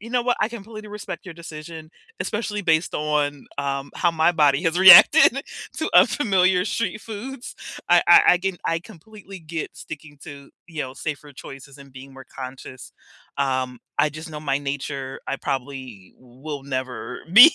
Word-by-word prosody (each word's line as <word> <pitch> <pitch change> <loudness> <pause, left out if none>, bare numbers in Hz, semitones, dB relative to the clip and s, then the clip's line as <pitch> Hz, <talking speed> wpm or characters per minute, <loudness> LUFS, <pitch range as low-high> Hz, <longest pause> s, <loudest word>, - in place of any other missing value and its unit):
you 230 +3 -10
know 250 -1 +1
what, 245 0 +1
I - - +2
completely 215 -1 -10
respect 210 -1 -8
your 180 - -8
decision, 160 -1 -10 0.3
especially 210 -1 -3
based 160 -2 +1
on, 150 -2 -1
um, 140 -1 -3
how 175 - +1
my 160 +1 +2
body 150 -3 +2
has 165 +2 +1
reacted 210 - +8 0.4
to - - -2
unfamiliar 190 -7 +4
street 225 -1 -2
foods. 235 +5 -8 0.3
I 175 0 +5
I 175 - +9
I - - -1
com 190 0 -3
I 165 - 0
completely 195 +1 -13
get 160 -1 -7
sticking 150 -1 -10
to, 140 -3 -11 0.2
you 160 -4 -5
know, 130 -1 -7
safer 145 0 -6
choices 135 +1 -12
and 140 -1 -15
being 135 +1 -12
more 135 -1 -13
conscious, 130 -1 -10 0.5
um, 130 -2 -1 0.2
I 150 - +4
just 155 +2 -9
know 150 -1 -7
my 140 -2 -1
nature. 140 -1 -5
I - - -2
probably 130 -8 -6
will 135 +4 -9
never 130 -3 -5
be 245 - +10
155 Hz, 170 wpm, -22 LUFS, 135-190 Hz, 0.5 s, be